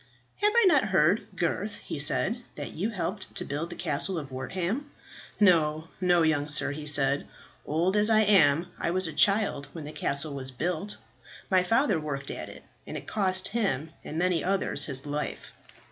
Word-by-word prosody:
"Have 420 0 +2
I 470 -2 +6
not 300 - +5
heard, 190 0 +2
Gurth," 200 +5 -2
he - - -6
said, 190 - +1
"that 145 -6 -6
you 185 - -2
helped 190 -1 -4
to - - -2
build 150 +4 -4
the 175 - -7
Castle 170 +3 +2
of 140 -4 -6
Wortham?" 185 - -3 0.5
"No, 160 -5 +3
no, 175 -2 +4
young 155 -2 +1
sir," 145 -1 +1
he 150 +1 -7
said; 140 -1 +2 0.4
"old 170 +6 +1
as 210 +1 +4
I 220 -1 +5
am, 170 -7 +4
I - - -1
was 185 +2 +1
a 160 - -6
child 200 -5 +2
when 160 -3 -7
the 150 - -7
castle 140 0 +1
was 135 -1 -6
built. 170 +9 -3 0.5
My 185 -1 +5
father 220 - +2
worked 145 -3 -4
at - - -6
it, - - -12 0.2
and - - -5
it - - -9
cost 185 -3 0
him, 160 - -1
and 155 - -6
many 175 -1 +1
others, 190 -6 +1
his 135 -1 -1
life." 145 +1 -4
170 Hz, 185 wpm, -28 LUFS, 150-195 Hz, 0.5 s, I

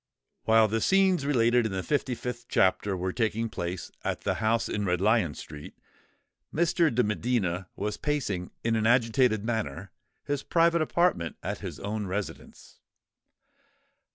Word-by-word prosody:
While 110 0 +5
the 110 +1 -1
scenes 190 - +3
related 120 -3 +3
in - - -6
the 95 -1 -3
fifty 140 -4 -1
fifth 120 +1 -6
chapter 95 +1 +2
were 90 +1 -2
taking 115 -1 -1
place 90 -3 -5
at - - -2
the - - 0
house 110 +1 +1
in 105 - -2
Red 90 -3 0
Lion 100 - +2
Street, 75 -1 -10 0.7
Mr. 170 0 +2
de 125 +2 +2
Medina 105 -5 -1
was 105 +1 -3
pacing 115 -12 -2
in 115 0 +1
an 110 0 +1
agitated 115 -2 +3
manner 110 -11 -3 0.3
his 145 -1 -2
private 170 +1 +3
apartment 155 - +1
at - - -3
his - - -7
own 105 0 -3
residence. 100 +2 -6
110 Hz, 150 wpm, -28 LUFS, 100-125 Hz, 0.7 s, While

